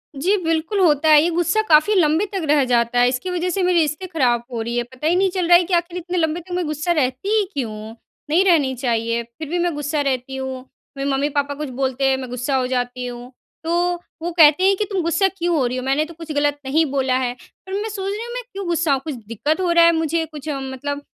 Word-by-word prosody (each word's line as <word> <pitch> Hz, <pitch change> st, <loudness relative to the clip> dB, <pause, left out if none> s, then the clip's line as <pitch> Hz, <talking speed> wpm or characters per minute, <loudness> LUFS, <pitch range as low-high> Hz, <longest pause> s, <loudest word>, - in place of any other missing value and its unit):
जी। 360 Hz, +9 st, +1 dB
बिल्कुल 330 Hz, +5 st, 0 dB
होता 315 Hz, -3 st, +3 dB
है, 300 Hz, -1 st, +8 dB
ये 340 Hz, -, +1 dB
गुस्सा 350 Hz, +6 st, +1 dB
काफ़ी 310 Hz, +7 st, +5 dB
लंबे 325 Hz, +2 st, +3 dB
तक 385 Hz, -, -2 dB
रह 295 Hz, -2 st, +4 dB
जाता 240 Hz, 0 st, +1 dB
है। 245 Hz, -, +5 dB
इसकी 255 Hz, +8 st, -3 dB
वजह 360 Hz, 0 st, -1 dB
से 375 Hz, +2 st, -1 dB
मेरे 360 Hz, -1 st, +3 dB
रिश्ते 310 Hz, +4 st, -1 dB
ख़राब 250 Hz, -9 st, +1 dB
हो 230 Hz, -2 st, -3 dB
रही 235 Hz, +1 st, -3 dB
हैं। 240 Hz, -, 0 dB
पता 260 Hz, +4 st, -4 dB
ही 345 Hz, -, +3 dB
नहीं 385 Hz, +1 st, +3 dB
चल 365 Hz, -2 st, -2 dB
रहा 345 Hz, 0 st, +8 dB
है 355 Hz, -, +1 dB
कि 360 Hz, +2 st, -5 dB
आखिर 345 Hz, +1 st, 0 dB
इतने 360 Hz, +1 st, -4 dB
लंबे 320 Hz, 0 st, 0 dB
तक 360 Hz, +2 st, -14 dB
मैं 360 Hz, -2 st, -1 dB
गुस्सा 305 Hz, +3 st, -2 dB
रहती 265 Hz, +2 st, 0 dB
ही 420 Hz, -, +3 dB
क्यों 245 Hz, -6 st, -3 dB
हूँ। 215 Hz, +1 st, -9 dB, 0.3 s
नहीं 340 Hz, +5 st, +4 dB
रहनी 300 Hz, -8 st, +3 dB
चाहिए, 235 Hz, -2 st, -1 dB
फ़िर 235 Hz, +6 st, -10 dB
भी 350 Hz, +1 st, -1 dB
मैं 345 Hz, -1 st, 0 dB
गुस्सा 295 Hz, +1 st, -1 dB
रहती 265 Hz, -1 st, -2 dB
हूँ। 265 Hz, -1 st, -4 dB, 0.4 s
मेरे 275 Hz, +1 st, -2 dB
मम्मी-पापा 285 Hz, +1 st, 0 dB
कुछ 300 Hz, -1 st, -5 dB
बोलते 265 Hz, +1 st, 0 dB
हैं 265 Hz, -, +2 dB
मैं 260 Hz, -1 st, -7 dB
गुस्सा 250 Hz, +3 st, -2 dB
हो 255 Hz, -1 st, +1 dB
जाती 250 Hz, 0 st, -2 dB
हूँ। 245 Hz, +1 st, -8 dB, 0.3 s
तो 330 Hz, +1 st, 0 dB, 0.5 s
वो 345 Hz, +1 st, -3 dB
कहते 315 Hz, 0 st, +5 dB
हैं 390 Hz, +1 st, +4 dB
कि, 420 Hz, -, 0 dB
"तुम 385 Hz, -2 st, 0 dB
गुस्सा 335 Hz, +4 st, +2 dB
क्यों 350 Hz, -3 st, -2 dB
हो 270 Hz, -5 st, +2 dB
रही 250 Hz, +1 st, -3 dB
हो? 255 Hz, -, -4 dB
मैंने 275 Hz, +4 st, +1 dB
तो 335 Hz, -, -11 dB
कुछ 320 Hz, -1 st, -9 dB
गलत 290 Hz, 0 st, 0 dB
नहीं 315 Hz, +4 st, +2 dB
बोला 260 Hz, -2 st, +1 dB
है।" 245 Hz, -1 st, -1 dB, 0.3 s
पर 380 Hz, -, -8 dB
मैं 440 Hz, -, -3 dB
सोच 395 Hz, -1 st, -4 dB
रही 425 Hz, +2 st, -4 dB
हूँ 475 Hz, -, -7 dB
मैं -, -, -4 dB
क्यों 390 Hz, -1 st, -5 dB
गुस्सा 330 Hz, -5 st, +1 dB
कुछ 280 Hz, +1 st, -6 dB
दिक़्क़त 295 Hz, -, -1 dB
हो 350 Hz, -2 st, +1 dB
रहा 340 Hz, 0 st, +6 dB
है 335 Hz, -, +6 dB
मुझे 325 Hz, +1 st, 0 dB
कुछ 305 Hz, -1 st, -9 dB
मतलब 275 Hz, +1 st, -4 dB
300 Hz, 260 wpm, -20 LUFS, 265-345 Hz, 0.5 s, है